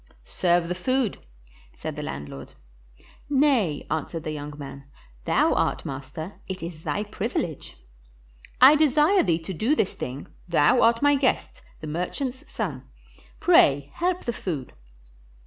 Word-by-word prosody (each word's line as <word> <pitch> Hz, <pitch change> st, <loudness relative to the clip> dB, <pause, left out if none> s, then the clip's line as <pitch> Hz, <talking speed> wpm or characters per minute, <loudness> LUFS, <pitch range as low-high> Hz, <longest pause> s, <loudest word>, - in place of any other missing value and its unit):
"Serve 175 Hz, -1 st, +1 dB
the 180 Hz, -, -1 dB
food," 255 Hz, +4 st, -1 dB, 0.6 s
said -, -, -6 dB
the -, -, -5 dB
landlord. 70 Hz, 0 st, -7 dB, 0.8 s
"Nay," 265 Hz, -, +2 dB
answered 160 Hz, +1 st, -3 dB
the 155 Hz, -, -3 dB
young 150 Hz, -1 st, -6 dB
man; 140 Hz, -1 st, -9 dB, 0.4 s
"thou -, -, +3 dB
art -, -, 0 dB
master, 140 Hz, +7 st, -7 dB
it 190 Hz, -2 st, -5 dB
is 165 Hz, -2 st, -7 dB
thy 205 Hz, -, -2 dB
privilege." 205 Hz, -, -4 dB, 0.8 s
"I 265 Hz, +4 st, +9 dB
desire 305 Hz, +5 st, +4 dB
thee 170 Hz, -5 st, +2 dB
to 165 Hz, +3 st, -6 dB
do 225 Hz, -, +1 dB
this 195 Hz, -, 0 dB
thing; 130 Hz, +3 st, -6 dB, 0.2 s
thou 165 Hz, +6 st, +4 dB
art 230 Hz, +2 st, +4 dB
my 290 Hz, 0 st, +5 dB
guest, 275 Hz, -2 st, 0 dB, 0.2 s
the -, -, -6 dB
merchant's 245 Hz, -, -4 dB
son; 155 Hz, -, -4 dB, 0.5 s
pray 140 Hz, 0 st, +4 dB
help 360 Hz, +1 st, -1 dB
the 235 Hz, -, -1 dB
food." 155 Hz, -, -5 dB
180 Hz, 140 wpm, -25 LUFS, -, 0.8 s, I